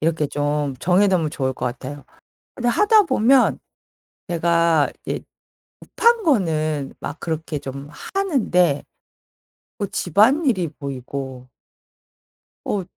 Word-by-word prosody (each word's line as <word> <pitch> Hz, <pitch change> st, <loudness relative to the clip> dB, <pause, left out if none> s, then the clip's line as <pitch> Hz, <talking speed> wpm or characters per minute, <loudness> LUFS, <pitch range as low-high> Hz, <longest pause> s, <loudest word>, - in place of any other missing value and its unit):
이렇게 155 Hz, -1 st, +1 dB
좀 145 Hz, -1 st, -1 dB
정해 185 Hz, +3 st, +3 dB
놓으면 170 Hz, -5 st, +1 dB
좋을 130 Hz, -4 st, -2 dB
것 125 Hz, -, -4 dB
같아요. 135 Hz, +2 st, -6 dB, 0.5 s
근데 245 Hz, -1 st, -1 dB
하다 420 Hz, -, +5 dB
보면 260 Hz, -, +3 dB, 0.7 s
제가 170 Hz, -2 st, +2 dB, 0.2 s
이제 -, -, -3 dB, 0.6 s
급한 470 Hz, -1 st, +2 dB
거는 155 Hz, -, 0 dB
막 145 Hz, -, -7 dB
그렇게 160 Hz, -2 st, -3 dB
좀 140 Hz, +2 st, -8 dB, 0.2 s
하는데 205 Hz, -, +2 dB, 1.0 s
뭐 200 Hz, -, -1 dB
집안일이 215 Hz, -, +2 dB
보이고 130 Hz, -1 st, -6 dB, 1.2 s
어, 200 Hz, -2 st, -1 dB
165 Hz, 215 characters per minute, -21 LUFS, 145-215 Hz, 1.2 s, 하다